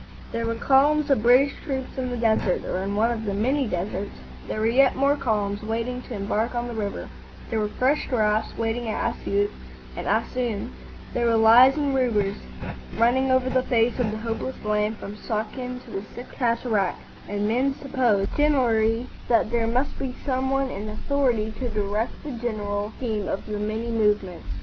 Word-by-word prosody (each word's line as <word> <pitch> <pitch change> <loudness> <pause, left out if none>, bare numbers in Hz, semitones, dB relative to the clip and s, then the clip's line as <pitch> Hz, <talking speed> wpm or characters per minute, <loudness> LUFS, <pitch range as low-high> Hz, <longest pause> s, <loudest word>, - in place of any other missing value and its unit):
There 230 0 -2
were 230 - -1
columns 285 +4 +3
of 265 - +4
British 250 +5 +5
troops 265 -2 -4
in 255 -1 -2
the 245 - -3
desert, 220 -5 +1
or 185 - -2
in 195 +2 -2
one 225 +3 +3
of 225 -2 -3
the 200 -1 -1
many 260 +6 +1
deserts; 195 +2 -3 0.3
there - - -3
were 215 - +1
yet 260 +4 +4
more 280 +2 +3
columns 205 -6 -1
waiting 230 +3 -2
to 245 - -7
embark 210 +4 -1
on 240 0 -1
the 240 - -5
river; 210 -3 -3 0.4
there 225 - +1
were 210 - +1
fresh 260 +7 +1
drafts 215 -4 +1
waiting 230 +1 -1
at 215 - 0
Assioot 205 +1 0 0.4
and - - -5
Assuan; 240 -5 -1 0.4
there 240 -1 +1
were 230 - +3
lies 240 +5 +7
and 285 -2 +1
rumours 220 -7 +1 0.6
running 250 +3 +3
over 260 0 +3
the 260 0 +2
face 240 -1 +1
of 240 -3 +1
the 215 - -3
hopeless 230 +3 -3
land 210 +1 +1
from 205 +1 -8
Suakin 250 +4 -4
to - - -13
the 195 - -3
Sixth 245 - -9
Cataract, 230 -5 0 0.3
and 205 0 -1
men 260 +5 +1
supposed 240 -8 +1
generally 240 -6 +3 0.2
that 230 -2 +3
there 230 -1 +1
must 250 +5 0
be 255 -2 -3
some 265 -1 0
one 270 -1 +1
in 210 +2 -5
authority 230 -2 0
to 250 -2 -2
direct 210 +1 -2
the 300 - -5
general 210 -4 -3
scheme 215 -5 -2
of 195 - -3
the 210 -1 -4
many 220 +3 -2
movements. 210 -5 0
230 Hz, 185 wpm, -25 LUFS, 210-255 Hz, 0.6 s, lies